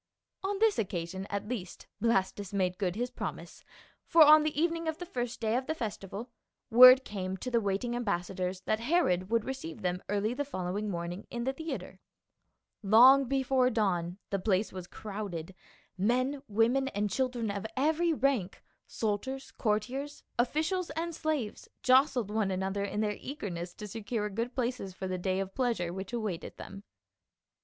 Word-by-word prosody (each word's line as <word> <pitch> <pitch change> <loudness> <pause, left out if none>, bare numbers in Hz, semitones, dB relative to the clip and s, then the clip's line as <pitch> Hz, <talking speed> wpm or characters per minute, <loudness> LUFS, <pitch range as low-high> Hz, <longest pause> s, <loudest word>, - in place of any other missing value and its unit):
On 395 +1 -1
this 440 0 +3
occasion 190 -1 -3
at 200 0 -3
least 210 -7 -5 0.2
Blastus 200 -3 +1
made 185 -2 0
good 185 -3 0
his 245 +3 -2
promise, - - -6 0.4
for 330 -1 +8
on 305 +1 +8
the 300 -1 -1
evening 335 0 0
of 320 -1 -1
the 355 - -6
first 245 -8 -4
day 220 0 0
of 255 +1 -1
the 315 - -1
festival, 215 -2 -5 0.4
word 255 +3 +10
came 190 -2 -4
to 255 - -5
the 235 -1 +3
waiting 205 +4 -1
ambassadors 185 -4 -2
that 215 +3 0
Herod 230 - +1
would 230 -1 +1
receive 255 -13 -6
them 180 0 -1
early 205 +3 0
the 285 +3 -2
following 205 -5 -3
morn 170 -2 -3
ing 190 - -10
in 235 0 -4
the 265 +2 0
theatre. 320 +3 -6 0.8
Long 250 +7 +7
before 265 -1 +2
dawn 185 -6 0
the 195 - 0
place 195 +1 +1
was 185 -2 -7
crowded, 195 -5 -6 0.5
men, 255 +7 +1
women 235 +5 +2
and 210 -5 -1
children 245 -2 -1
of 200 +2 -4
every 320 +5 +2
rank, 260 - 0 0.2
soldiers, 250 +5 -3
courtiers, 255 +7 -2 0.2
officials 320 +8 0
and 335 +1 -2
slaves 305 -9 -3
jostled 255 -4 +4
one 215 -2 +1
another 190 +1 -1
in 205 +1 -2
their 210 -1 -1
eager 265 -8 -5
ness 175 +1 -5
to 210 - -7
secure 210 0 -3
good 230 +5 -3
places 240 -7 -2
for 190 - -4
the 185 0 -3
day 185 +1 0
of 195 0 -4
pleasure 230 -10 0
which 190 +1 -6
awaited 215 -8 -4
them. 200 0 -9
220 Hz, 170 wpm, -30 LUFS, 195-265 Hz, 0.8 s, word